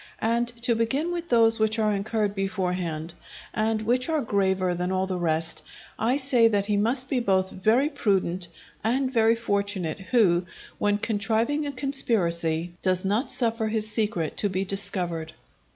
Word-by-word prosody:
And 235 +2 0 0.2
to 240 -1 +4
begin 265 +9 0
with 345 -1 -4
those 225 -1 +4
which 220 +1 +1
are 215 -1 +2
incurred 205 0 -1
beforehand, 180 -5 -2 0.4
and 220 0 0
which 250 +6 +1
are 315 -2 +1
graver 190 -4 +1
than 180 +1 -2
all 190 0 +1
the 185 -1 -3
rest, 165 -1 -1 0.4
I 240 +5 +2
say 260 -4 +4
that 205 -3 +1
he 210 0 0
must 240 +6 +1
be 260 -1 0
both 190 -4 +1
very 225 +9 +2
prudent 190 - 0 0.4
and 260 +4 0
very 225 -1 +4
fortunate 200 -6 -2
who, 190 -5 +2 0.3
when 205 0 +2
contriving 230 +7 0
a - - -2
conspiracy, 175 - 0
does 185 0 +1
not 210 +7 0
suffer 230 -2 0
his 215 0 -1
secret 210 -8 -1
to 205 - +1
be 190 +1 -1
discovered. 175 -5 -1
210 Hz, 160 wpm, -26 LUFS, 185-235 Hz, 0.4 s, to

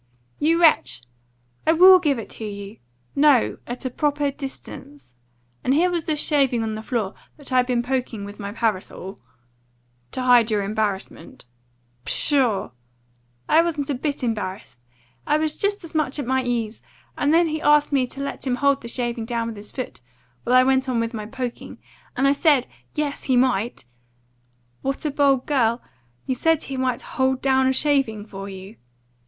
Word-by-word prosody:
"You 325 +3 +3
wretch! 315 - +3 0.6
I 320 - +6
will 370 +3 +8
GIVE 295 -6 +1
it 225 - -7
to - - -8
you! 200 0 -7 0.4
No, 280 -4 +4
at 245 +2 -6
a 255 - -2
proper 290 +1 0
distance. 275 - -10 0.5
And 265 - +2
here 355 +4 +3
was 340 -3 -2
this 305 -2 0
shaving 270 -7 +2
on 220 -1 -2
the 215 - -5
floor, 220 -4 -2 0.2
that 285 -3 -9
I'd 250 -1 +3
been 245 -2 +1
poking 245 -5 -2
with 205 +1 -10
my 200 -1 -5
parasol 205 -3 -3 0.5
" 120 0 -41
"To 255 - -2
hide 245 -2 +5
your 210 -2 +1
embarrassment." 200 -7 -4 0.6
"Pshaw! 250 - +1 0.8
I 320 - +5
wasn't 300 -4 -2
a - - +1
bit 280 +1 -3
embarrassed. 190 - -4 0.5
I 300 - +3
was 310 0 -1
just 405 -1 -1
as 335 - -10
much 305 -3 0
at 285 - -3
my 260 +1 +1
ease! 235 -3 -2 0.3
And 290 - +1
then 335 +1 +4
he 310 0 -3
asked 295 0 +4
me 265 -3 +2
to 275 - -8
let 280 0 -5
him 250 - +1
hold 280 +2 +2
the 235 - -8
shaving 235 -1 -2
down 230 0 -2
with 225 - -7
his 205 0 -10
foot, 255 - -6 0.4
while 250 - +2
I 255 - +7
went 265 0 +2
on 245 -2 +1
with 230 +1 -2
my 215 -2 -5
poking. 245 +1 -6 0.4
And 270 +2 +3
I 275 - +5
said 285 -3 +3 0.3
yes 295 -2 -3
he 260 -2 +2
might 245 - +1 0.5
" 120 0 -41
"What 275 +3 -3
a 300 - 0
bold 275 -2 +2
girl! 235 -5 +2 0.5
You 260 - 0
said 320 +5 +1
he 270 - -5
might 255 -2 -1
hold 260 0 -1
a 265 -1 +3
shaving 265 -6 +1
down - - -14
for 195 -2 -8
you?" 195 +3 -10
255 Hz, 185 wpm, -23 LUFS, 220-285 Hz, 0.8 s, will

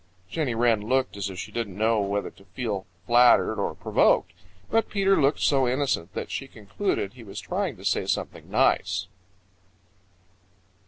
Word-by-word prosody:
Jenny 145 -8 -1
Wren 115 -2 +3
looked 130 +3 0
as 100 0 -3
if 95 - -8
she - - -6
didn't 105 -6 -4
know 110 +1 +2
whether 100 +1 -2
to - - -20
feel 105 -6 -4 0.2
flattered 120 0 +5
or - - -2
provoked. 90 - +2 0.4
But 225 0 +2
Peter 195 -1 +3
looked 140 +2 +2
so 135 -3 +3
innocent 125 - -1
that - - -4
she 135 - -4
concluded 110 - -3
he 125 -2 -12
was 100 -1 -8
trying 180 - -3
to 95 - -12
say - - +1
something - - -3
nice. 85 - +2
120 Hz, 160 wpm, -26 LUFS, 100-135 Hz, 0.4 s, flattered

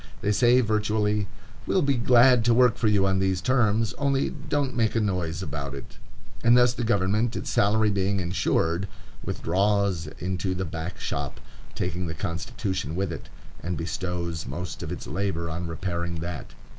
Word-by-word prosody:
They 105 - +1
say, 120 +4 +5
virtually, 105 -2 +1 0.4
"We'll 185 - +2
be 140 0 +3
glad 125 0 +5
to 120 -1 +4
work 125 -1 +5
for 115 - +1
you 100 -2 +3
on 95 -1 +2
these 95 -1 +1
terms, 115 -1 +2
only 140 -1 +1
don't 145 -3 -2
make 115 -2 +1
a - - +3
noise 90 -5 -1
about 70 -4 -5
it." 70 - -11 0.4
And 120 +1 +6
thus 125 -1 +5
the 120 - -3
government, 110 +1 +1
its - - -3
salary 105 +1 +3
being 100 0 0
insured, 85 0 0 0.4
withdraws 100 -2 0
into 95 +1 -2
the 95 +1 -2
back 80 +3 -5
shop, - - -4 0.4
taking 90 +2 -2
the 80 - -4
Constitution 85 -1 -3
with 95 -2 -1
it, - - -9 0.3
and 90 -1 -3
bestows 85 0 -3
most 90 +1 -5
of - - -5
its - - -5
labor 90 -4 -2
on 85 +2 -4
repairing 85 +1 -3
that. 85 -2 -6
95 Hz, 170 wpm, -26 LUFS, 85-110 Hz, 0.4 s, And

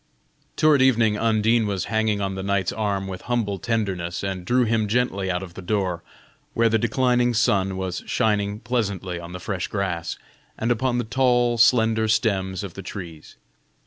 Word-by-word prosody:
Toward 155 -3 +4
evening 115 -5 +4
Undine 110 +1 +2
was 95 -3 -2
hanging 110 -2 0
on 95 -1 -1
the 95 - -5
knight's 100 -2 0
arm 100 -2 -1
with 95 -1 -6
humble 105 -5 0
tenderness, 100 -8 -2
and 95 -2 -3
drew 125 +4 +3
him 110 -2 +1
gently 105 -4 0
out 90 +1 -1
of 90 -2 -10
the 95 - -8
door, 90 -3 -1 0.5
where 115 0 +3
the 110 0 +2
declining 120 +1 +2
sun 95 -4 +2
was 95 -1 -3
shining 105 -2 0
pleasantly 100 -7 -2
on 85 0 -9
the 90 - -6
fresh 90 0 -3
grass, 95 -5 -3 0.4
and 115 +2 0
upon 120 +1 +1
the 120 - 0
tall, 120 0 +2
slender 110 -1 +4
stems 95 -4 0
of 95 -4 -7
the 100 - -8
trees. 85 -5 -9
105 Hz, 175 wpm, -23 LUFS, 95-115 Hz, 0.5 s, Toward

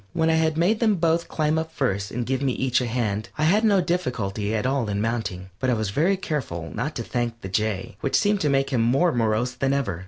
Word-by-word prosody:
When 160 0 +2
I - - +3
had 160 -1 +1
made 195 +7 +2
them 220 -3 +3
both 170 -1 +1
climb 155 0 0
up 160 0 -4
first 100 -10 -1
and 120 0 -3
give 130 +1 -1
me 135 -2 +1
each 130 0 +1
a 125 - -1
hand, 110 -4 -2
I 155 - 0
had 200 +8 +3
no 205 -4 +4
difficulty 115 - -2
at 110 - -1
all 130 -4 0
in 100 0 -1
mounting, 105 -5 -3
but 130 - 0
I 125 - +3
was 110 -3 -2
very 170 - +2
careful 130 - -4
not 140 +8 -3
to 115 - -3
thank 120 -1 -3
the 95 - -6
Jay, 105 +3 -2
which 140 - 0
seemed 205 -1 +2
to 150 - +2
make 135 0 +1
him 125 -4 +2
more 135 +9 +3
morose 115 -1 +1
than 135 +2 0
ever. 115 -11 -1
130 Hz, 250 wpm, -24 LUFS, 110-160 Hz, -, no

